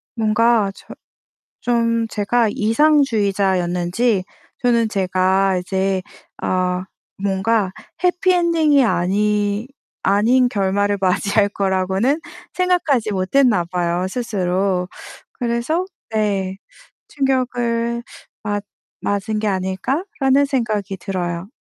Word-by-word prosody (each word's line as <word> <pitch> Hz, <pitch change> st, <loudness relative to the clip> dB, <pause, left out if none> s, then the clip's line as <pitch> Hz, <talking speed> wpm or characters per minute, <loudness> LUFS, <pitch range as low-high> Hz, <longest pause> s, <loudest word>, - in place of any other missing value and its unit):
뭔가 220 Hz, -1 st, +2 dB
저 -, -, -17 dB, 0.8 s
좀 230 Hz, -1 st, +1 dB
제가 220 Hz, +2 st, +1 dB
이상주의자였는지 205 Hz, -, +2 dB, 0.4 s
저는 235 Hz, -2 st, +3 dB
제가 190 Hz, -1 st, +1 dB
이제 190 Hz, +1 st, -1 dB, 0.4 s
아 185 Hz, 0 st, -1 dB, 0.4 s
뭔가 195 Hz, +1 st, +1 dB, 0.3 s
해피엔딩이 340 Hz, -5 st, +3 dB
아니 210 Hz, +2 st, +1 dB, 0.3 s
아닌 235 Hz, +6 st, +3 dB
결말을 205 Hz, -1 st, 0 dB
맞이할 200 Hz, +2 st, +2 dB
거라고는 195 Hz, -, 0 dB, 0.4 s
생각하지 335 Hz, -, +1 dB
못했나 195 Hz, +1 st, +2 dB
봐요 175 Hz, 0 st, 0 dB
스스로. 190 Hz, -4 st, -1 dB, 0.4 s
그래서 245 Hz, +9 st, -1 dB, 0.2 s
네 200 Hz, -4 st, -1 dB, 0.5 s
'충격을 240 Hz, -4 st, -1 dB, 0.4 s
맞 205 Hz, -1 st, -2 dB, 0.3 s
맞은 205 Hz, +2 st, -1 dB
게 215 Hz, -, -1 dB
아닐까?'라는 265 Hz, -, 0 dB
생각이 215 Hz, -7 st, -2 dB
들어요. 180 Hz, -2 st, -3 dB
210 Hz, 210 characters per minute, -20 LUFS, 190-240 Hz, 0.8 s, 저는